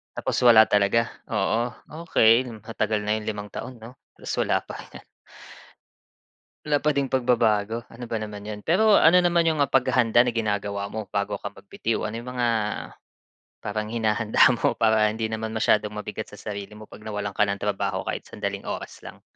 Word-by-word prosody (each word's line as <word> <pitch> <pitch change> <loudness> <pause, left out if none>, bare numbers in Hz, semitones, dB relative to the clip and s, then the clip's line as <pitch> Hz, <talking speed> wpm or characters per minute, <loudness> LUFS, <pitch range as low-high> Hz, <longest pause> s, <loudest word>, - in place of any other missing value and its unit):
Tapos - - -2
wala 110 -2 +8
talaga? 105 +3 +2 0.2
Oo, 120 +2 -1 0.3
okey 115 -5 +4 0.2
matagal 110 -1 -2
na 105 +1 0
yung 105 - -7
limang 105 -1 -4
taon, 120 +1 -8
'no 125 +3 -12 0.2
tas - - -11
wala - - +1
pa. - - -9 1.9
Wala 145 -1 +2
pa 150 -1 +1
ding 140 -1 -1
pagbabago, 115 -3 +1
ano 120 +1 -9
ba 115 - -3
naman 105 -1 -8
yun. 105 -1 -5
Pero 205 +6 +4
ano 170 +3 +6
naman 175 -1 +3
yung, 160 -2 +1
ah, 140 - +3
paghahanda 125 -3 +3
na 125 - 0
ginagawa 105 -3 -2
mo 110 -2 -7
bago 100 +1 -1
ka 100 - -6
magbitiw? 110 +2 -3
Ano 110 - -6
yung 125 - -7
mga 120 - +2 1.2
parang 105 +1 -3
hinahanda 110 +1 +3
mo - - +1
para 110 -1 +3
hindi 110 +1 -3
naman 110 0 -4
masyadong 105 -1 +2
mabigat 105 +1 -6
sa 105 - -12
sarili 105 0 -7
mo 110 - -11
pag 105 - -14
nawalan 105 -2 -4
ka 105 0 +2
ng 100 - -1
trabaho 100 -2 -2
kahit - - -5
sandaling 100 -1 -4
oras - - -6
lang? - - -12
110 Hz, 175 wpm, -25 LUFS, 105-120 Hz, 1.9 s, wala